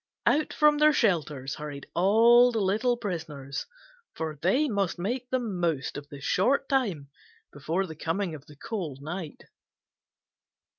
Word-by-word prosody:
Out 300 +1 +2
from 300 -1 +4
their 305 0 +6
shelters 150 - 0
hurried 145 -2 -7
all 230 +7 +6
the 225 - -1
little 215 +5 +1
prisoners, 160 - -5 0.5
for 160 -1 -4
they 255 - +2
must 200 -7 -1
make 240 +8 -3
the 260 - +1
most 175 - -2
of 145 0 -8
the 140 - -9
short 245 - +1
time 195 - -1 0.4
before 160 +6 -1
the 160 - -8
coming 165 +3 -2
of 150 -2 -10
the 150 - -14
cold 160 - -5
night. 165 0 -6
185 Hz, 145 wpm, -27 LUFS, 150-235 Hz, 0.5 s, their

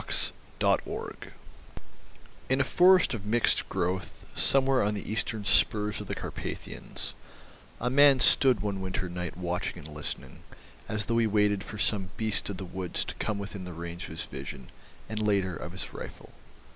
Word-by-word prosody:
THE - - -1
INTERLOPERS - - -1 1.2
In 130 +1 +3
a - - +5
forest 180 +3 +5
of 110 -5 -4
mixed 120 +2 +2
growth 90 0 -2
somewhere 135 -1 +4
on 105 +1 +1
the 100 - -5
eastern 110 0 -2
spurs 105 0 +2
of - - -8
the - - -2
Karpathians, - - -4 0.7
a 125 +1 0
man 140 0 +7
stood 125 -1 +5
one 100 -2 -2
winter 95 0 -2
night 85 -1 -5
watching 90 0 -2
and 75 - -9
listening, 75 0 -6 0.5
as 105 -1 -1
though 115 +1 +1
he 115 - +3
waited 105 -2 +2
for 105 - -8
some 100 -3 0
beast 110 -2 0
of 100 - -4
the 95 - -5
woods 90 0 -3
to - - -5
come 110 -2 -1
within 100 -1 -6
the 90 -1 -7
range 85 +1 -6
of - - -9
his - - -3
vision, 65 -2 -8 0.4
and, 110 -1 -3
later, 100 -4 +1
of 85 - -6
his 90 -4 -6
rifle. - - -9
100 Hz, 170 wpm, -29 LUFS, 90-110 Hz, 1.2 s, man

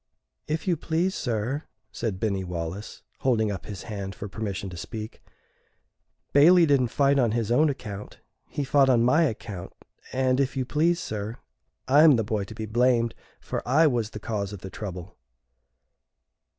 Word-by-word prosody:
"If 155 +3 -2
you 175 - +3
please, 170 +5 0
sir," 120 - -2 0.3
said 110 -6 -3
Binny 100 -2 -1
Wallace, 90 +3 -6 0.2
holding 110 -5 +2
up 95 - -6
his 100 -3 -7
hand 100 -2 -5
for 100 - -6
permission 100 0 -4
to - - -8
speak, 110 +5 -7 1.1
"Bailey 170 +5 +7
didn't 140 -5 +3
fight 140 +3 +2
on 120 -4 +2
his 115 -2 -1
own 150 +5 +4
account; 105 -7 -6 0.3
he 145 - -2
fought 135 0 +4
on 120 -3 +4
my 145 +7 +4
account, 105 - -5 0.4
and, 130 0 +1
if 135 0 0
you 130 - 0
please, 165 +6 +2
sir, 110 +2 -4 0.5
I 140 +3 +6
am 155 -3 +8
the 115 - +1
boy 105 -1 -2
to 110 - -10
be 110 - -4
blamed, 120 +1 +2 0.3
for - - -4
I 145 +7 +4
was 120 -7 +1
the 105 - -8
cause 105 -2 -3
of 100 -3 -8
the 95 - -8
trouble." 90 -3 -7
115 Hz, 170 wpm, -26 LUFS, 105-140 Hz, 1.1 s, am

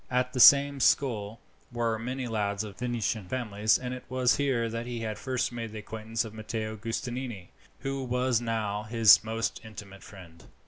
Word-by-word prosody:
At 125 0 0
the 130 - -3
same 140 +2 +7
school 115 -5 +1 0.3
were 115 -2 -1
many 125 +3 -4
lads 105 -2 -1
of 105 -2 -8
good 125 - -3
Venetian 110 -4 -2
families, 110 -2 +1
and 125 0 -5
it 125 - -7
was 130 -1 +2
here 130 -5 0
that 115 +1 -5
he 120 -2 -4
had 110 -1 -4
first 130 -2 -2
made 115 -2 -6
the - - -6
acquaintance 110 +2 -4
of 110 - -9
Matteo 110 0 -4
Giustiniani, 115 -2 -5 0.3
who 135 0 -3
was 125 -1 0
now 110 -3 -2
his 110 0 +6
most 115 +1 -3
intimate 105 -3 -11
friend. 85 -4 -14
115 Hz, 180 wpm, -28 LUFS, 110-125 Hz, 0.3 s, same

